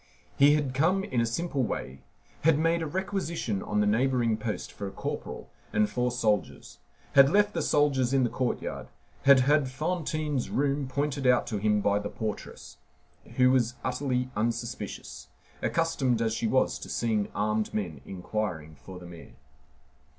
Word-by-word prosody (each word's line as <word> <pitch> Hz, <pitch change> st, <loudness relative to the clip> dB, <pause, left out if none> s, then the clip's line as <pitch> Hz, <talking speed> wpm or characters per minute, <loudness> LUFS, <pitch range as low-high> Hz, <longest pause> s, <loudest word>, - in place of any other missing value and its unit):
He 145 Hz, +2 st, +6 dB
had 145 Hz, -4 st, -1 dB
come 175 Hz, +8 st, +2 dB
in 125 Hz, -11 st, 0 dB
a 115 Hz, -, +1 dB
simple 140 Hz, +3 st, -1 dB
way, 65 Hz, -, -3 dB, 0.4 s
had 160 Hz, -1 st, +5 dB
made 165 Hz, +2 st, +2 dB
a 160 Hz, -, -2 dB
requisition 170 Hz, -, -2 dB
on 105 Hz, 0 st, 0 dB
the -, -, +2 dB
neighboring 120 Hz, +1 st, +2 dB
post 110 Hz, -1 st, -4 dB
for 100 Hz, -, -6 dB
a -, -, -6 dB
corporal -, -, -6 dB, 0.2 s
and 105 Hz, 0 st, +2 dB
four 125 Hz, +4 st, 0 dB
soldiers, 110 Hz, -4 st, -1 dB, 0.3 s
had 140 Hz, -1 st, +7 dB
left 205 Hz, +4 st, +3 dB
the -, -, -1 dB
soldiers 135 Hz, -4 st, +2 dB
in 135 Hz, -1 st, +3 dB
the 120 Hz, -, +1 dB
courtyard, 130 Hz, -2 st, -3 dB, 0.4 s
had 135 Hz, -1 st, +8 dB
had 145 Hz, 0 st, +3 dB
Fantine's 155 Hz, -1 st, -2 dB
room 140 Hz, 0 st, 0 dB
pointed 140 Hz, 0 st, -1 dB
out 125 Hz, -1 st, +4 dB
to 105 Hz, -3 st, -3 dB
him 105 Hz, 0 st, +2 dB
by 100 Hz, 0 st, +2 dB
the 105 Hz, 0 st, -4 dB
portress, 110 Hz, -2 st, -6 dB, 0.6 s
who 125 Hz, 0 st, +5 dB
was 125 Hz, -1 st, +2 dB
utterly 125 Hz, -1 st, -1 dB
unsuspicious, 115 Hz, -1 st, -4 dB, 0.3 s
accustomed 140 Hz, -8 st, +1 dB
as 115 Hz, -1 st, 0 dB
she 115 Hz, 0 st, -1 dB
was 130 Hz, +4 st, +1 dB
to -, -, -9 dB
seeing 110 Hz, -3 st, 0 dB
armed 105 Hz, +1 st, 0 dB
men 85 Hz, -10 st, -4 dB
inquiring 90 Hz, -4 st, -4 dB
for 75 Hz, +7 st, -11 dB
the 90 Hz, -, -11 dB
mayor. 85 Hz, -1 st, -12 dB
125 Hz, 165 wpm, -28 LUFS, 105-145 Hz, 0.6 s, had